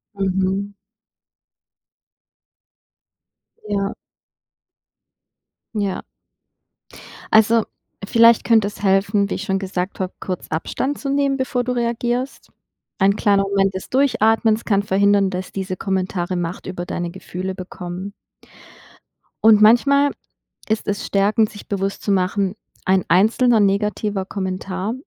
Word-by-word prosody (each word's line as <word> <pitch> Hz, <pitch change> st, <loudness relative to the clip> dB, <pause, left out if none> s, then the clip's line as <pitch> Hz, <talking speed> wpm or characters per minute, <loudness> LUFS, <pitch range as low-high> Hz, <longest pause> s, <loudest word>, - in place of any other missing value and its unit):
Mhm. 195 Hz, +1 st, -1 dB, 2.9 s
Ja. 200 Hz, 0 st, -1 dB, 1.8 s
Ja. 200 Hz, -3 st, -2 dB, 1.3 s
Also, 220 Hz, +1 st, +5 dB, 0.4 s
vielleicht 230 Hz, +1 st, +5 dB
könnte 220 Hz, -3 st, +3 dB
es 205 Hz, -, -9 dB
helfen, 200 Hz, +1 st, +2 dB
wie -, -, -2 dB
ich 205 Hz, -, -5 dB
schon 195 Hz, -1 st, -1 dB
gesagt 185 Hz, 0 st, -4 dB
habe, 185 Hz, -1 st, -3 dB
kurz 185 Hz, -2 st, -5 dB
Abstand 260 Hz, -, -2 dB
zu 275 Hz, -, -5 dB
nehmen, 275 Hz, -1 st, +1 dB
bevor 260 Hz, -1 st, -1 dB
du 250 Hz, +1 st, -2 dB
reagierst? 240 Hz, +2 st, -2 dB, 0.5 s
Ein 195 Hz, +1 st, +3 dB
kleiner 200 Hz, -2 st, +2 dB
Moment 195 Hz, -1 st, +1 dB
des 190 Hz, -, -6 dB
Durchatmens 225 Hz, -4 st, +2 dB
kann 200 Hz, -2 st, +2 dB
verhindern, 200 Hz, 0 st, +3 dB
dass 185 Hz, 0 st, -5 dB
diese 190 Hz, -1 st, -4 dB
Kommentare 185 Hz, -2 st, -2 dB
Macht 175 Hz, 0 st, -4 dB
über 180 Hz, -1 st, -5 dB
deine 175 Hz, -1 st, -4 dB
Gefühle 185 Hz, 0 st, -6 dB
bekommen. 185 Hz, +1 st, -7 dB, 1.3 s
Und, 220 Hz, -1 st, +7 dB
manchmal 280 Hz, +6 st, +5 dB, 0.6 s
ist 220 Hz, 0 st, -1 dB
es 205 Hz, -1 st, -2 dB
stärkend, 210 Hz, +2 st, +2 dB
sich 205 Hz, -, -12 dB
bewusst 195 Hz, 0 st, -3 dB
zu 205 Hz, -, -1 dB
machen, 195 Hz, +1 st, 0 dB, 0.3 s
1 190 Hz, -1 st, +2 dB
einzelner 220 Hz, +6 st, +4 dB
negativer 200 Hz, 0 st, 0 dB
Kommentar 190 Hz, +1 st, -4 dB
200 Hz, 115 wpm, -20 LUFS, 190-220 Hz, 2.9 s, Und